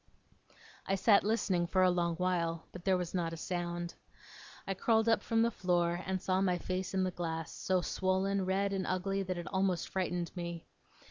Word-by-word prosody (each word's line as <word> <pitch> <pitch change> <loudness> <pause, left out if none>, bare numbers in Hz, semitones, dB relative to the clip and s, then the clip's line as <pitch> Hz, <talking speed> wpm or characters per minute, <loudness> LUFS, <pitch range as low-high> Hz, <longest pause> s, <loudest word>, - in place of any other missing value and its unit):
I 195 - +2
sat 200 +1 +5
listening 195 -5 +1
for 185 +1 +3
a 185 - +5
long 170 -1 0
while, 170 -2 -1
but 180 -1 -10
there 190 -2 +4
was 180 -2 -4
not 170 -3 -1
a - - -5
sound. 175 0 -3 0.7
I 195 - -1
crawled 220 +3 +2
up 225 - +4
from 225 0 +2
the 235 - +2
floor, 175 -3 +1
and 190 0 0
saw 185 +1 +1
my 180 -2 +2
face 185 +2 -3
in 190 - +2
the 185 - 0
glass, 165 -2 -4
so 185 -1 0
swollen, 190 +2 0
red, 195 +2 0
and 190 -1 -1
ugly 195 +2 0
that 185 -2 -3
it 175 - -5
almost 190 -3 0
frightened 180 -2 -2
me. 170 -2 -5
185 Hz, 195 wpm, -33 LUFS, 175-195 Hz, 0.7 s, sat